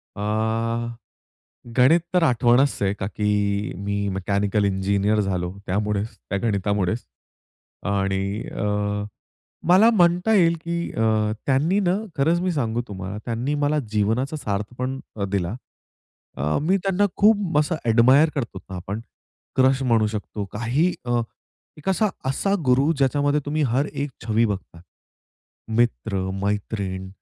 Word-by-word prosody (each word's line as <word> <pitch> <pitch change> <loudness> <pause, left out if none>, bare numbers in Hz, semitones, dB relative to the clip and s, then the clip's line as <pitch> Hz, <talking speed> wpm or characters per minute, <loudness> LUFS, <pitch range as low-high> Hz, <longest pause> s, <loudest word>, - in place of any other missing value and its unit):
अ, - - -9 1.6
गणित 135 +7 +6
तर 180 - +4
आठवणच 125 0 +3
आहे, 100 0 +2
का 95 -2 -4
की 105 -1 0
मी 100 0 -1
मेकॅनिकल 100 +2 0
इंजिनिअर 100 +2 +1
झालो, 90 -3 -1
त्यामुळेच 105 +2 -1
त्या 100 - -4
गणितामुळेच. 100 -1 0 0.8
आणि 100 +1 -1
अ, - - -4 1.0
मला 195 +6 +7
म्हणता 180 +1 +3
येईल, 170 -3 +4
की 170 0 -2
अ, 110 -1 +1
त्यांनी 150 +9 +2
ना 185 0 +2 0.2
खरंच 165 +5 +2
मी 180 -1 0
सांगू 120 -5 -1
तुम्हाला 95 +1 -6
त्यांनी 120 +5 -2
मला 150 +1 +2
जीवनाचा 115 +8 0
सार्थ 105 -2 -3
पण 130 +1 -2 0.3
दिला. 100 0 -1 0.8
अ, 75 +3 0
मी 185 +5 +3
त्यांना 195 +1 +2
खूप 205 -7 +3
असं 155 +2 +1
एडमायर 130 +7 +5
करतो 115 -8 -3
ना 95 - -5
आपण 100 +4 -5 0.6
क्रश 130 +1 +4
म्हणू 115 -4 +3
शकतो. 105 -1 -4
काही 130 +11 +1
अ, 120 -1 +1 0.6
एक 150 - -6
असा 200 +3 +2 0.2
असा 195 +9 0
गुरु 135 +5 +3
ज्याच्यामध्ये 145 +2 +2
तुम्ही 150 +1 0
हर 130 +5 +1
एक 140 0 -3 0.2
छबी 115 +1 +3
बघतात. 95 -4 -5 0.9
मित्र-मैत्रीण 100 -3 -1
115 Hz, 130 wpm, -23 LUFS, 100-150 Hz, 1.6 s, मला